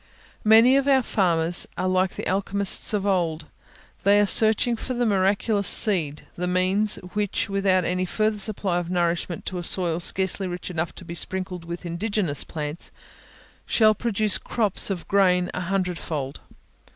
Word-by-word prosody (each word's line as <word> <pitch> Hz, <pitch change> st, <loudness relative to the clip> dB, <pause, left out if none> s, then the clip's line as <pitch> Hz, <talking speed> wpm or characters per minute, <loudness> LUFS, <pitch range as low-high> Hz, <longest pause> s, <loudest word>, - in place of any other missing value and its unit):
Many 225 Hz, +5 st, +6 dB
of 275 Hz, 0 st, 0 dB
our 265 Hz, -2 st, +4 dB
farmers 175 Hz, -5 st, 0 dB
are 185 Hz, -, -1 dB
like 185 Hz, 0 st, 0 dB
the -, -, -6 dB
alchemists 200 Hz, +2 st, +1 dB
of 205 Hz, -2 st, -1 dB
old, 170 Hz, -6 st, -1 dB, 0.6 s
they 200 Hz, +1 st, +4 dB
are 205 Hz, -, +4 dB
searching 220 Hz, +3 st, +5 dB
for 255 Hz, +3 st, -5 dB
the 240 Hz, 0 st, 0 dB
miraculous 200 Hz, 0 st, +1 dB
seed, 160 Hz, -8 st, +2 dB
the 180 Hz, +1 st, -3 dB
means, 185 Hz, +4 st, +2 dB, 0.2 s
which, 205 Hz, -1 st, -2 dB
without 195 Hz, -2 st, +1 dB
any 180 Hz, 0 st, -1 dB
further 215 Hz, +2 st, -1 dB
supply 195 Hz, -3 st, -1 dB
of 175 Hz, -1 st, -6 dB
nourishment 175 Hz, -1 st, -2 dB
to 185 Hz, -, -4 dB
a -, -, -6 dB
soil 170 Hz, -2 st, +3 dB
scarcely 190 Hz, +2 st, 0 dB
rich 180 Hz, +1 st, -6 dB
enough 165 Hz, -1 st, -3 dB
to 185 Hz, -, -11 dB
be 170 Hz, -, -7 dB
sprinkled 185 Hz, 0 st, -4 dB
with 170 Hz, +1 st, -7 dB
indigenous 175 Hz, -2 st, -2 dB
plants, 150 Hz, +1 st, -6 dB, 0.8 s
shall 215 Hz, -2 st, +4 dB
produce 215 Hz, -2 st, 0 dB
crops 210 Hz, -5 st, 0 dB
of 185 Hz, -4 st, -5 dB
grain 180 Hz, -2 st, +2 dB
a 185 Hz, -, -4 dB
hundred 180 Hz, -1 st, -2 dB
fold. 140 Hz, -4 st, -5 dB
185 Hz, 165 wpm, -24 LUFS, 175-205 Hz, 0.8 s, Many